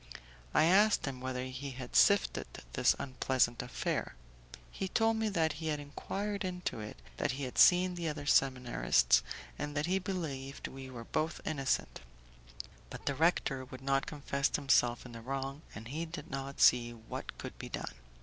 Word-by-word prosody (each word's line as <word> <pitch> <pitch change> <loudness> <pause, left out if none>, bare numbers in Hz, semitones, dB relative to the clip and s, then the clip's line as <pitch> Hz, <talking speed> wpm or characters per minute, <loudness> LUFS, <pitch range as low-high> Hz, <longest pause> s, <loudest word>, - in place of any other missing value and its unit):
I - - +4
asked 200 +6 +5
him 130 -2 -5
whether 130 -1 -3
he 130 +2 -5
had 125 -2 -7
sifted 200 -1 +4 0.3
this - - +4
unpleasant 130 -2 +1
affair; 125 -1 -2 0.6
he 190 - -3
told 225 +3 +2
me 220 -1 +1
that 160 -6 +1
he 160 - -3
had 150 -1 0
enquired 200 +8 -4
into 180 -9 -3
it, 105 - -7 0.2
that - - 0
he 140 +2 -4
had 125 - -3
seen 180 0 +7
the 170 -2 -2
other 150 -1 -5
seminarist, 125 - +3 0.4
and 145 0 -3
that 145 - +1
he 185 +3 +1
believed 155 -8 -4
we 135 0 -9
were 120 -2 -7
both 155 +7 -1
innocent; 140 -4 -1 0.9
but - - -9
the 140 - +1
rector 140 -3 +1
would 130 0 -10
not 135 +1 +1
confess 140 -2 -1
himself 130 -4 +3
in 125 - -9
the 115 -1 -8
wrong, 135 +3 -4
and 110 +3 -8
he 160 +5 -3
did 165 +2 -8
not 135 0 -5
see 120 -1 +5
what 115 -1 -7
could - - -7
be - - -6
done. - - -5
140 Hz, 175 wpm, -33 LUFS, 130-165 Hz, 0.9 s, seen